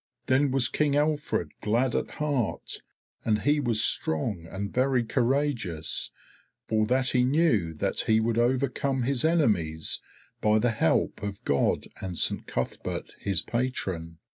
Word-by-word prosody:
Then 135 +2 +3
was 130 -2 +3
King 145 -2 +1
Alfred 150 0 0
glad 120 +4 +1
at - - -1
heart, 145 -7 -2 0.4
and 105 -1 +1
he 145 +1 +3
was 120 -6 +3
strong 85 +2 +1
and 100 +2 -5
very 130 -1 +2
courageous, 115 - -1 0.6
for 110 -1 +1
that 130 +2 +2
he 125 -1 +3
knew 125 - +2
that - - -1
he 110 0 +3
would 115 +1 +1
overcome 130 +1 +1
his 130 0 0
enemies 105 - +1 0.4
by 105 0 +4
the 115 +2 +2
help 110 - +1
of 100 -1 -5
God 70 - +1 0.2
and 90 -3 -4
Saint - - +1
Cuthberht 65 - -4
his 95 -3 -1
patron. 95 -10 -3
120 Hz, 140 wpm, -27 LUFS, 100-135 Hz, 0.6 s, by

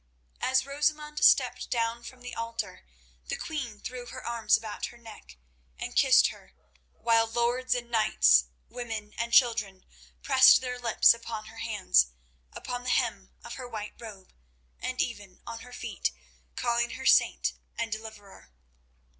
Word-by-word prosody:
As 260 0 +2
Rosamund 300 +1 -1
stepped - - +4
down 230 -1 -1
from 250 +1 -11
the 245 - -7
altar 230 - -5 0.4
the - - -2
queen 250 -9 -5
threw 245 +1 -7
her 255 - -9
arms 235 -2 +2
about 220 -1 -5
her 240 - -14
neck 220 - -14 0.4
and - - -6
kissed - - +6
her, 65 - -14 0.4
while 230 - +2
lords 240 +2 0
and 240 -1 -5
knights, 60 - +4 0.2
women 225 -4 -6
and 235 0 -2
children, 225 -7 +3 0.4
pressed 260 -1 +7
their 250 -1 -5
lips 235 -1 +5
upon 230 -2 -7
her 225 +1 -12
hands, 60 - +2 0.4
upon 245 0 -6
the 250 - -3
hem 220 -7 0
of 235 - -8
her 250 - -8
white 215 -2 -6
robe, 210 -5 -11 0.5
and - - -2
even - - -8
on - - -7
her - - -13
feet, - - -3 0.4
calling 235 0 0
her 265 - -8
"Saint" - - +3 0.2
and 230 -1 -3
"Deliverer." 215 - -9
230 Hz, 150 wpm, -28 LUFS, 215-245 Hz, 0.5 s, pressed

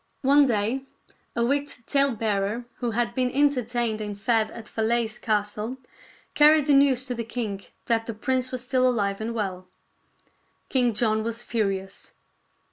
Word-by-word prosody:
One 280 +1 +5
day 230 +3 0 0.5
a 235 - +1
wicked 280 -2 -1
talebearer 225 -5 0
who 245 - -2
had 235 +1 -1
been 255 0 +1
entertained 245 -5 +1
and 205 -1 -5
fed 225 0 +2
at 225 -2 -10
Falaise 225 0 -1
Castle 210 +3 -2 0.6
carried 300 0 +6
the 290 - +3
news 275 -2 +4
to 255 - -3
the 235 -1 -3
king 220 -4 -4 0.2
that 225 -1 0
the 230 - -4
prince 255 +3 -1
was 255 -2 -4
still 255 0 +2
alive 200 -4 -1
and 230 +1 -3
well. 185 -4 -3 1.0
King 245 -4 +2
John 220 0 +1
was 230 +1 -4
furious. 195 -5 -3
235 Hz, 150 wpm, -25 LUFS, 215-255 Hz, 1.0 s, carried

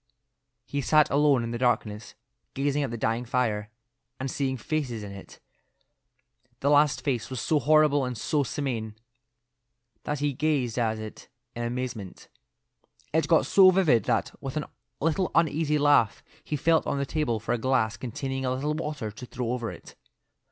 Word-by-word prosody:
He 140 +2 -2
sat 150 +3 +4
alone 140 -3 +4
in 115 - -4
the 120 - -3
darkness, 110 -4 -1 0.4
gazing 140 +1 0
at 140 - -1
the 120 - -4
dying 115 +2 0
fire, 115 -5 -1 0.5
and 130 0 -3
seeing 130 -2 -1
faces 125 -4 -3
in 100 - -7
it. 100 -1 -12 1.2
The 140 - +2
last 145 0 +4
face 120 -6 -1
was 130 -2 -4
so 155 - +1
horrible 150 -1 +4
and 125 -2 -3
so 145 +6 0
simian 120 -6 -3 1.1
that 150 - -2
he 145 0 0
gazed 130 -5 0
at 110 -2 0
it 110 0 -9 0.3
in 120 - -4
amazement. 120 -5 -5 0.8
It 160 +1 +2
got 165 -1 +4
so 190 -1 +7
vivid 175 -11 +3
that, 115 -3 0
with 135 +1 -5
a 150 - -3 0.3
little 165 +4 +1
uneasy 155 -2 +2
laugh, 145 -7 +3 0.2
he 150 - -3
felt 160 +3 +2
on - - 0
the 140 - -1
table 140 -6 -1
for 110 +3 -2
a 120 - -1
glass 115 -3 +1
containing 135 +2 -4
a 130 - 0
little 145 +3 -1
water 150 -8 -4
to 120 +4 -9
throw 120 -1 -3
over 120 -2 -2
it. - - -11
130 Hz, 170 wpm, -27 LUFS, 115-150 Hz, 1.2 s, so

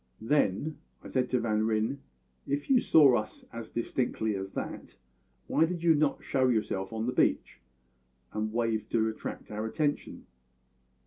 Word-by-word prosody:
"Then," 145 +3 +1 0.3
said 130 -1 +1
I - - -15
to 125 - +1
Van 110 -2 +1
Ryn, 110 +5 0 0.5
"if 145 - -2
you 255 - +6
saw 140 - +6
us 105 0 -6
as 115 -1 -7
distinctly 115 -2 -1
as 95 0 -5
that, - - -6 0.5
why 160 - +3
did 170 0 -4
you 165 -1 +6
not 150 -1 +1
show 130 -1 +2
yourself 105 -5 0
on 110 0 -2
the 125 - 0
beach, 65 - +1 0.7
and 110 0 -2
wave 115 -1 -1
to 110 -1 +2
attract 110 - -7
our 105 +1 -3
attention?" 145 +5 -2
115 Hz, 155 wpm, -29 LUFS, 110-140 Hz, 0.7 s, you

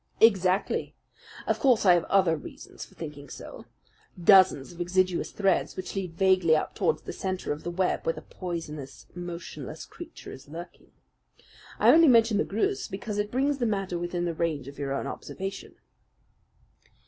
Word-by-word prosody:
"Exactly. 190 -3 +3 0.5
Of - - 0
course 250 -6 +3
I 180 - +8
have 175 -1 +2
other 185 -4 +3
reasons 150 - -10
for - - -15
thinking 145 -3 -8
so - - -10 0.5
dozens 180 -6 +5
of 175 - -8
exiguous 185 0 +1
threads 195 -3 0
which 185 - -5
lead 185 -4 -4
vaguely 185 -4 +4
up 155 - -1
towards 470 - 0
the - - -6
centre 185 -1 -3
of 150 - -9
the - - -4
web 180 +1 0
where 165 - 0
the - - -10
poisonous, 150 - -7
motionless 175 -1 -7
creature 345 -1 -11
is 135 +2 -12
lurking. 170 +3 -10 0.9
I - - +6
only 330 0 +7
mention 230 -4 +5
the - - +1
Greuze 385 - -1
because 205 +1 -4
it 205 0 -1
brings 275 +4 0
the 240 - +1
matter 195 -4 -2
within 175 0 -2
the 170 - -1
range 155 -5 -2
of 140 +1 -10
your 140 -1 -3
own 140 - -2
observation." 195 +1 -6
185 Hz, 170 wpm, -27 LUFS, 165-200 Hz, 0.9 s, I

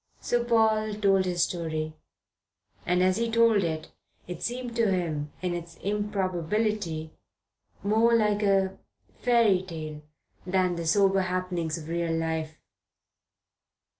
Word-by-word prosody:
So 240 0 0
Paul 220 -2 +2
told 195 -2 +3
his 175 -2 +1
story, 155 -3 -2 0.9
and 180 +1 +3
as 185 0 +3
he 230 0 0
told 230 -3 +4
it, 160 -2 -3 0.4
it 175 -1 -6
seemed 245 -1 -4
to 225 -4 +3
him, 155 -5 -2
in 180 -1 0
its 170 -1 -6
improbability, 195 -3 -1 0.7
more 220 +3 +4
like 210 -2 +2
a 195 -2 +2 0.4
fairy 230 -6 +4
tale 155 -4 -7 0.4
than 185 -1 +1
the 170 -1 -4
sober 195 +2 +4
happenings 180 -3 -2
of 155 -2 -9
real 170 0 -1
life. 160 -1 -2
185 Hz, 125 wpm, -27 LUFS, 165-210 Hz, 0.9 s, told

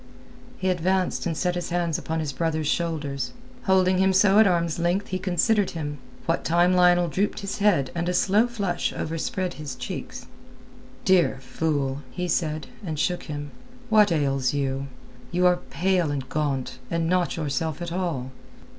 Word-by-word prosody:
He 190 - 0
advanced 185 +1 0
and 165 -2 -2
set 180 0 +1
his 175 -1 -3
hands 170 -2 0
upon 160 0 -2
his 145 -3 -3
brother's 160 +2 -1
shoulders. 145 -5 -1 0.3
Holding 185 -1 +3
him 190 0 +4
so 195 +2 +5
at 220 - +7
arm's 170 -2 +1
length 175 +4 0
he 185 - -2
considered 190 +3 +2
him, 145 -2 -4 0.3
what 165 - 0
time 175 +2 +3
Lionel 175 -1 +5
drooped 200 +6 -1
his 200 +1 -4
head 170 -11 +3
and 170 +1 -1
a - - 0
slow 205 +6 +3
flush 200 -7 -1
overspread 180 +4 -2
his 140 -4 -5
cheeks. - - -6 0.8
"Dear 180 -7 +4
fool!" 140 -1 -1
he 180 +8 -3
said, 155 -3 -1 0.2
and 160 -5 -4
shook 175 +4 -1
him. 145 -2 -6 0.4
"What 210 -3 +5
ails 135 -4 +1
you? 135 -1 -1 0.4
You 180 +1 +2
are 180 0 +5
pale 180 -2 +1
and 140 -3 -3
gaunt, 140 -4 -2
and 165 -1 0
not 180 0 +1
yourself 155 0 -2
at 175 -1 -5
all. 165 -8 -2
170 Hz, 165 wpm, -25 LUFS, 150-185 Hz, 0.8 s, at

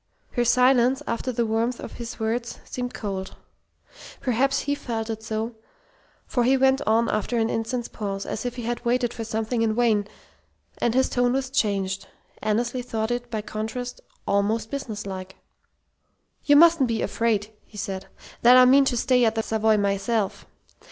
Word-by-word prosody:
Her 240 - +1
silence, 250 +2 +4
after 230 +2 -2
the 235 -1 0
warmth 225 +2 0
of - - -7
his 235 -1 -7
words, 230 +2 -2
seemed 245 -1 -4
cold. 195 -3 -5 0.8
Perhaps 260 +2 +1
he 285 - -1
felt 225 -5 -3
it 220 0 -5
so, 220 +1 -3 0.7
for 245 - 0
he 265 +3 +4
went 265 0 +3
on 225 +2 +3
after 230 +3 -1
an 225 0 +1
instant's 235 +2 -2
pause, 200 -2 -4
as 220 - -4
if 245 -1 -3
he 245 - -6
had 240 +1 -3
waited 240 0 +1
for 230 - -5
something 225 +1 -2
in 220 -1 +1
vain, 220 -4 +2 0.7
and 235 0 +1
his 260 0 +4
tone 245 0 +1
was 265 0 -2
changed. 195 -6 0 0.3
Annesley 235 +4 0
thought 225 -2 -2
it, 245 0 -3
by 220 -3 -3
contrast, 225 +4 -5 0.3
almost 205 +3 0
businesslike. 200 -8 -5 1.1
"You 290 - +6
mustn't 325 -3 +6
be 225 -1 -1
afraid," 220 -2 0
he 210 - -14
said, 190 -1 -4 0.3
"that 245 +2 +8
I 255 - +8
mean 270 +2 +6
to 250 -2 0
stay 250 +1 +3
at 225 -1 +2
the 225 - 0
Savoy 220 -1 +2
myself. 200 +1 -1
230 Hz, 170 wpm, -25 LUFS, 215-250 Hz, 1.1 s, that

